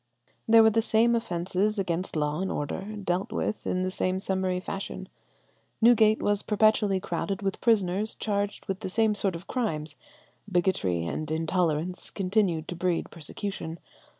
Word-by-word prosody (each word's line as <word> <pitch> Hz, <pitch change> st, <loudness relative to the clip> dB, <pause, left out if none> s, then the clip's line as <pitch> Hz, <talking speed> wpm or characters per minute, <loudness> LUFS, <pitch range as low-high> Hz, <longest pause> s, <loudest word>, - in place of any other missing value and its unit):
There 225 Hz, 0 st, +8 dB
were 220 Hz, -, +6 dB
the 225 Hz, +1 st, +3 dB
same 230 Hz, +1 st, +3 dB
offences 200 Hz, -1 st, 0 dB
against 180 Hz, -2 st, -2 dB
law 150 Hz, +2 st, 0 dB
and 190 Hz, -, -1 dB
order, 145 Hz, +4 st, -3 dB
dealt 190 Hz, -2 st, -2 dB
with 215 Hz, -, -2 dB
in 185 Hz, 0 st, 0 dB
the 185 Hz, -, -1 dB
same 185 Hz, 0 st, 0 dB
summary 190 Hz, -1 st, -1 dB
fashion. 195 Hz, +1 st, -5 dB, 0.7 s
Newgate 220 Hz, -2 st, +5 dB
was 205 Hz, 0 st, +2 dB
perpetually 210 Hz, -2 st, +3 dB
crowded 195 Hz, +1 st, -3 dB
with 195 Hz, -1 st, -2 dB
prisoners 210 Hz, -2 st, +1 dB
charged 205 Hz, -1 st, -2 dB
with 195 Hz, -1 st, -3 dB
the -, -, -4 dB
same 220 Hz, +2 st, +2 dB
sort 195 Hz, -3 st, -1 dB
of 170 Hz, +3 st, -8 dB
crimes. 155 Hz, -, -2 dB, 0.6 s
Bigotry 170 Hz, -, +1 dB
and 155 Hz, -, -3 dB
intolerance 165 Hz, +1 st, -1 dB
continued 185 Hz, -4 st, 0 dB
to 175 Hz, -, -4 dB
breed 175 Hz, 0 st, -1 dB
persecution. 165 Hz, 0 st, -5 dB
190 Hz, 150 wpm, -27 LUFS, 175-210 Hz, 0.7 s, There